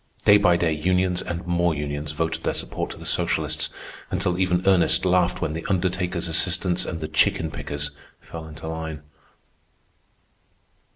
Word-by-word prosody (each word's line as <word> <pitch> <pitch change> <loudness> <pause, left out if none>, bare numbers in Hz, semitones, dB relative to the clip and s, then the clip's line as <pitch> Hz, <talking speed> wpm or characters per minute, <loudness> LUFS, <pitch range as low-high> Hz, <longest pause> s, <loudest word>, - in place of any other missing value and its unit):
Day 105 - +8
by 100 -4 +4
day 85 -2 +1
unions 90 +3 +1
and 85 -1 -5
more 85 -1 +1
unions 75 0 -4
voted 80 +2 -2
their - - 0
support - - -2
to - - -8
the - - -10
socialists, - - +1 0.4
until 90 -1 0
even 90 -1 +1
Ernest 95 0 +4
laughed 90 -1 +2
when 75 - -1
the 80 +1 -4
Undertakers' 90 -2 0
Assistants 85 +2 +1
and 80 -2 -5
the 80 - -3
Chicken 80 0 +2
Pickers 75 -3 -4 0.3
fell 80 -1 -9
into 80 0 -9
line. 80 -2 -5
85 Hz, 155 wpm, -24 LUFS, 80-90 Hz, 0.4 s, Day